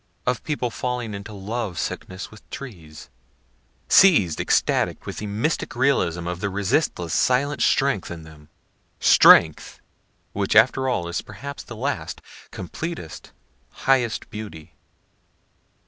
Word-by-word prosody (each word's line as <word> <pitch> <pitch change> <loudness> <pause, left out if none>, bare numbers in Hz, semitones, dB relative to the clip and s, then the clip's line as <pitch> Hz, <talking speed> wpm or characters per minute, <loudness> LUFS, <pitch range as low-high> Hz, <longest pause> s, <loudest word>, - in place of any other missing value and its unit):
of 125 -1 -1
people 135 -6 -2
falling 125 -2 -3
into 100 +2 -7
love 105 -1 -4
sickness 95 +4 -5
with 110 - -16
trees, 85 - -10 0.8
seiz'd 105 - +5
extatic - - +1
with - - -6
the 105 - -5
mystic 110 +11 -2
realism 120 -10 +1
of 90 0 -4
the 100 - -2
resistless 100 - -1
silent 130 +1 +1
strength 135 -8 +2
in 85 -2 -8
them 75 -1 -15 0.5
strength, 80 -2 +5 0.5
which - - -1
after 130 0 +4
all 85 -9 -1
is 85 -1 -3
perhaps 125 +7 -8
the - - -10
last, - - -3 0.3
completest, 125 - -7 0.5
highest 130 -4 +2
beauty. 85 -7 -9
105 Hz, 120 wpm, -23 LUFS, 85-130 Hz, 0.8 s, seiz'd